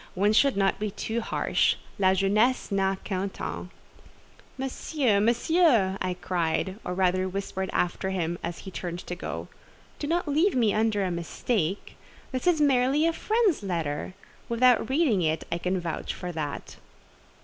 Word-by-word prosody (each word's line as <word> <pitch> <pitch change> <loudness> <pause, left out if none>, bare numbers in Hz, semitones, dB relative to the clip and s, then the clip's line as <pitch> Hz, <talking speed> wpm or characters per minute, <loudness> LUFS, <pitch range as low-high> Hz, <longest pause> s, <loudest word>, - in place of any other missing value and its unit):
one 205 +3 +3
should 275 +1 +4
not 195 -1 +2
be 210 0 -1
too 225 +3 -3
harsh; - - +1 0.2
'la 190 -1 +4
jeunesse 210 +6 +2
n'a 195 -1 +1
qu'un 195 0 -2
temps.'" 180 - -6 0.9
"Monsieur, 265 -3 0
Monsieur!" 235 - +3
I 180 -1 -1
cried, 180 +3 -1
or 180 - -3
rather 185 0 +1
whispered 190 0 -3
after 180 +2 0
him, 175 -2 -2
as 170 0 -4
he 190 - -7
turned 175 -1 -5
to - - -4
go, 175 - -5 0.5
"do 290 - -3
not 340 +1 0
leave 315 +6 +2
me 230 -5 +3
under 215 -2 +1
a 185 - -1
mistake. 170 +2 -2 0.3
This 255 +4 -3
is 345 -3 +4
merely 275 +1 +3
a 330 - +2
friend's 430 - +1
letter. 170 -3 -3 0.3
Without 240 0 +4
reading 265 - +2
it, 160 -1 0
I 170 - -1
can 180 +2 -1
vouch 170 -2 -4
for 180 - -5
that." 150 -4 -5
200 Hz, 160 wpm, -27 LUFS, 180-255 Hz, 0.9 s, should